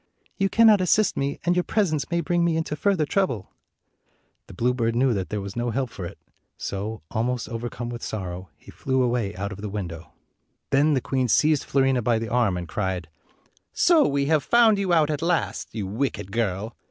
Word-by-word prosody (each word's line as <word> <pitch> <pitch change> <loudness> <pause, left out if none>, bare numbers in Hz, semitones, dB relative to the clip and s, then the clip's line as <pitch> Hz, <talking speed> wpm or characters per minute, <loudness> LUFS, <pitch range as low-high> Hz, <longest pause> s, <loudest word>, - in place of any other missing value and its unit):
"You 195 0 +1
cannot 220 -3 +6
assist 200 +3 +3
me, 140 +1 -2
and 175 0 +3
your 180 - +3
presence 155 -11 0
may 170 0 0
bring 175 0 +1
me 170 -1 +1
into 160 -2 -2
further 185 -1 +1
trouble." 145 - -1 1.0
The - - -12
bluebird 115 +1 0
knew 125 +1 +3
that 95 -3 -3
there 105 -1 -3
was 100 0 -7
no 120 0 -1
help 125 +1 -2
for 90 - -6
it, - - -11 0.4
so, 105 0 -5
almost 120 +2 -1
overcome 120 0 -5
with 120 -1 -6
sorrow, 95 -3 -5
he - - -15
flew 130 -1 0
away 120 -5 -1
out 100 +2 -4
of 100 0 -8
the 105 - -4
window. 90 -5 -6 0.6
Then 145 +2 +4
the 130 - +1
queen 130 0 0
seized 150 +5 +3
Fiorina 135 -2 +2
by 115 0 +2
the 115 0 -4
arm 115 -6 +1
and 85 -1 -5
cried, 95 -3 -3 0.6
"So 340 -3 +4
we 140 0 0
have 155 -1 +2
found 230 -3 +4
you 195 -2 0
out 155 -3 +3
at 150 - -3
last, 170 0 -1
you 105 -3 -2
wicked 105 -2 -3
girl! 110 0 -2
125 Hz, 200 wpm, -24 LUFS, 105-155 Hz, 1.0 s, cannot